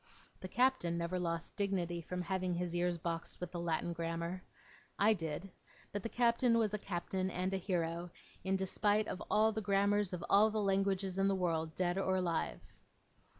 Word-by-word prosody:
The 185 - -6
Captain 245 -6 +2
never 170 +2 -1
lost 170 -1 -2
dignity, 180 -4 -1
from 180 +2 -4
having 185 0 -1
his 175 0 -2
ears 175 0 +1
boxed 165 0 -4
with 180 -1 -5
the 175 - -4
Latin 170 0 -1
Grammar. 170 +2 -3 0.6
I 215 +2 +5
did; 165 0 -4 0.4
but 205 - -3
the 230 - -4
Captain 235 0 +3
was 215 -2 +2
a 210 - -1
Captain 185 0 -2
and 185 +1 -2
a - - +1
hero, 175 -2 -2 0.3
in 190 0 +1
despite 205 +2 +1
of 185 - -4
all 220 +1 +4
the 220 0 -3
grammars 200 0 +2
of 180 -2 -4
all 210 +2 +6
the 215 - -3
languages 195 -1 +1
in 195 - +4
the 195 - +2
world, 165 -3 -1
dead 180 +1 +1
or 190 -1 +1
alive. 165 - -1
185 Hz, 185 wpm, -35 LUFS, 170-200 Hz, 0.6 s, all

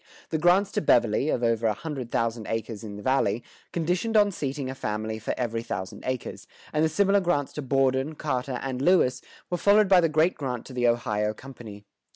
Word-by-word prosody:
The 160 - 0
grants 185 +4 +4
to - - -1
Beverley, 120 0 +3
of 125 - 0
over 115 -1 +2
a 105 - +1
hundred 135 -3 -6
thousand 115 -1 -1
acres 115 -1 -4
in 105 -2 -7
the 105 - -9
Valley, 120 -4 +1 0.3
conditioned 180 +7 0
on 205 -1 +5
seating 140 -5 -3
a 130 - -4
family 110 -2 -3
for 110 - -3
every 115 -2 -2
thousand 95 -5 -6
acres, 130 -1 -4 0.3
and 150 - +2
the 160 - +3
similar 200 +4 +3
grants 175 -7 0
to 150 - -4
Borden, 135 +2 +1
Carter, 130 -4 -2
and 130 -1 -3
Lewis, 160 -5 +3 0.3
were 175 - +1
followed 205 +1 +5
by 185 -2 +6
the 165 - +2
great 155 +4 +3
grant 125 -4 -4
to 130 - -10
the 120 -1 +1
Ohio 105 -3 0
Company. 115 -5 -11
130 Hz, 200 wpm, -26 LUFS, 115-160 Hz, 0.3 s, by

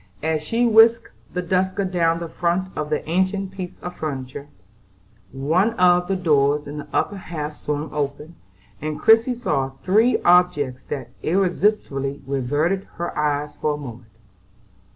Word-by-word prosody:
As 160 -1 0
she 230 +10 0
whisked 230 0 +5 0.2
the 180 - -3
duster 190 +2 0
down 170 -3 +1
the 170 0 -5
front 175 +3 -2
of 150 -1 -3
the 150 - -2
ancient 190 +3 0
piece 185 -2 -7
of 175 - -6
furniture, 140 -2 -5 0.8
one 165 - +1
of 180 -3 +4
the 195 - 0
doors 150 -4 +2
in 145 +1 -6
the - - -8
upper 205 - 0
half 155 -5 -6
swung 150 +1 -3
open, 150 +2 -3 0.5
and 155 0 -4
Christie 225 +3 +5
saw 145 - -1
three 220 +6 +4
objects 175 -8 +3
that 130 -4 -6
irresistibly 175 -6 0
riveted 145 +8 0
her 175 - -4
eyes 150 0 -1
for 150 -1 0
a - - -7
moment. 120 -5 -9
165 Hz, 150 wpm, -22 LUFS, 145-190 Hz, 0.8 s, whisked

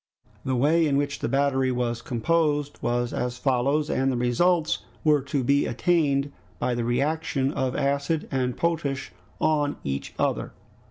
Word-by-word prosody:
The 130 - -1
way 155 +6 +3
in 140 -1 +2
which 145 0 -1
the - - -2
battery 135 -1 +2
was 120 -1 -1
composed 145 +3 0
was 120 0 -1
as 125 0 -2
follows, 135 +4 +1
and 135 -2 +1
the 125 - -1
results 155 +7 +2 0.2
were 150 -2 +4
to 135 0 -2
be 140 +3 +2
attained 140 0 +1 0.3
by 125 - 0
the 120 0 -1
reaction 135 +2 0
of 130 -1 -1
acid 140 +3 0
and 125 -2 -1
potash 160 -5 -1 0.3
on 150 -2 +1
each 70 0 -4
other. - - -1
140 Hz, 155 wpm, -25 LUFS, 125-150 Hz, 0.3 s, were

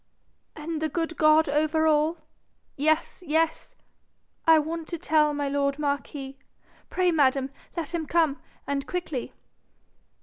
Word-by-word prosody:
'And 310 +1 -5
the 315 - 0
good 330 +2 -2
God 310 +1 +5
over 310 +2 +1
all 310 +2 +2 0.3
?' - - -44
'Yes, 315 +5 0
yes.' 325 0 0 0.7
'I 325 -1 +8
want 320 +1 -2
to 340 - -4
tell 310 -2 +2
my 290 -1 -2
lord 280 0 0
marquis. 280 -2 -3 0.5
Pray, 365 -1 +2
madam, 275 -3 +2 0.3
let 335 0 -3
him 325 -3 -2
come, 320 -4 +1 0.2
and 280 -1 -2
quickly.' 330 -8 -4
310 Hz, 135 wpm, -26 LUFS, 285-325 Hz, 0.7 s, I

